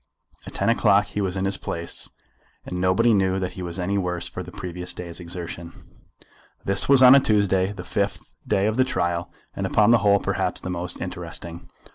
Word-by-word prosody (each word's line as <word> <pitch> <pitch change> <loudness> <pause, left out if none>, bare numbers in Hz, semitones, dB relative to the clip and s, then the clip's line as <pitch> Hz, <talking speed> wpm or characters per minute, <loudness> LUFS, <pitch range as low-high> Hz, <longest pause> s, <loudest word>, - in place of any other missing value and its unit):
At - - -9
ten - - 0
o'clock 100 +2 +4
he 105 0 -4
was 95 -1 -2
in 95 - -1
his 95 0 -1
place, 85 0 -5 0.6
and 90 0 -4
nobody 95 +6 +3
knew 95 -2 +2
that 95 -1 -3
he 90 - -9
was 85 -1 -5
any 95 +2 -1
the - - +1
worse 90 -1 -3
for - - -6
the - - -9
previous 90 0 -5
day's 85 -1 -7
exertion. 85 -1 -7 0.9
This 100 +5 +3
was 135 -2 +7
on 125 0 +10
a 140 - +8
Tuesday, 100 -5 +2
the 100 -4 -8
fifth 100 +2 -2 0.2
day 95 - +2
of 110 +2 0
the 130 - +5
trial, 85 -8 -2 0.2
and - - -2
upon 105 +1 +4
the 120 - +6
whole 100 -1 +4
perhaps - - -1
the 90 - -5
most 90 0 -4
interesting. 85 0 -6
95 Hz, 205 wpm, -24 LUFS, 90-100 Hz, 0.9 s, on